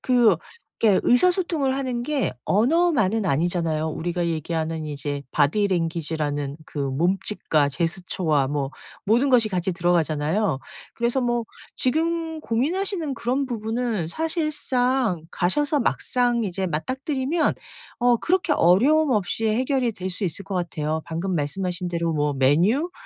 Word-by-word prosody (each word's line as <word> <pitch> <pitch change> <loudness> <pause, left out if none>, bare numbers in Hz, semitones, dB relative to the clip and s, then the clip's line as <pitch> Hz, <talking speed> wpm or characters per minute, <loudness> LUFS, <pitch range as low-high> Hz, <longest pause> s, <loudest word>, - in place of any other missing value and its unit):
그 240 -8 +4 0.5
이렇게 210 -4 +5
의사소통을 320 -1 +2
하는 255 -3 -2
게 285 +1 -1
언어만은 225 - +2
아니잖아요. 165 0 0
우리가 175 +2 -2
얘기하는 160 0 -2
이제 145 -1 -4
보디랭귀지라는 155 -4 0
그 - - -8
몸짓과 155 +1 +1
제스처와 165 -2 0
뭐 140 -2 -2 0.3
모든 235 +7 +3
것이 235 -4 +4
같이 185 -1 -1
들어가잖아요. 170 0 +1 0.4
그래서 235 +3 0
뭐 240 -1 0 0.3
지금 320 +3 0
고민하시는 315 - -1
그런 260 +3 -1
부분은 225 -5 -2
사실상 265 - 0
가셔서 290 - +1
막상 240 0 +1
이제 190 -1 -2
맞닥뜨리면 265 - -1 0.5
어 245 0 +4
그렇게 345 -2 +1
어려움 270 - +4
없이 215 +2 0
해결이 250 +1 +1
될 185 -1 -5
수 195 +2 -4
있을 185 +3 -3
것 195 - -5
같아요. 160 -3 -2
방금 170 +3 -2
말씀하신 180 +4 -2
대로 170 -1 -1
뭐 150 -1 0
메뉴? 175 - +2
200 Hz, 310 characters per minute, -24 LUFS, 165-260 Hz, 0.5 s, 이렇게